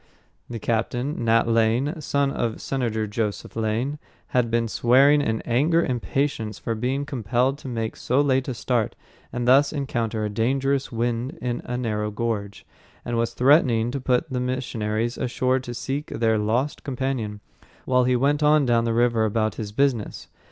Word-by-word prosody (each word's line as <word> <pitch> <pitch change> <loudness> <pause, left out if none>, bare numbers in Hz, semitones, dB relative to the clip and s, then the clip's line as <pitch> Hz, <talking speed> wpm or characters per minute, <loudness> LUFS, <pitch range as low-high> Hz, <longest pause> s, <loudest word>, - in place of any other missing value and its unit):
The 120 - -4
captain, 120 +5 -2
Nat 115 +1 +3
Lane, 115 +8 +1
son 140 -1 0
of 115 -4 -2
Senator 115 -5 -1
Joseph 105 0 -3
Lane, 115 +6 -1 0.3
had 125 -2 +1
been 115 0 +1
swearing 135 +6 +4
in 110 -5 -1
angry 155 +8 +2
impatience 120 -3 -2
for 115 - -3
being 130 +5 -1
compelled 125 +2 0
to 135 - -9
make 115 -3 -3
so 130 +3 0
late 135 -2 +2
a 130 - -3
start 115 0 -1 0.4
and 120 0 -3
thus 140 +3 +5
encounter 115 -7 -2
a - - -2
dangerous 135 +5 0
wind 120 +5 -2
in 120 -1 -3
a 125 - -3
narrow 105 -3 -1
gorge, 105 -2 -3 0.4
and 120 - -2
was 115 0 -1
threatening 125 -4 +4
to 135 +1 -4
put 125 +4 +1
the 130 -3 -3
missionaries 120 -3 -2
ashore 130 +1 +1
to 125 -1 -7
seek 135 +5 -4
their 110 -1 +1
lost 120 +7 -1
companion, 130 -6 -3 0.5
while 125 -1 +3
he 125 0 +2
went 140 +4 +2
on 150 -1 +4
down 120 -1 +2
the 115 - 0
river 120 -1 +3
about 110 0 0
his 105 -2 -6
business. 125 -2 -1
120 Hz, 165 wpm, -24 LUFS, 115-135 Hz, 0.5 s, thus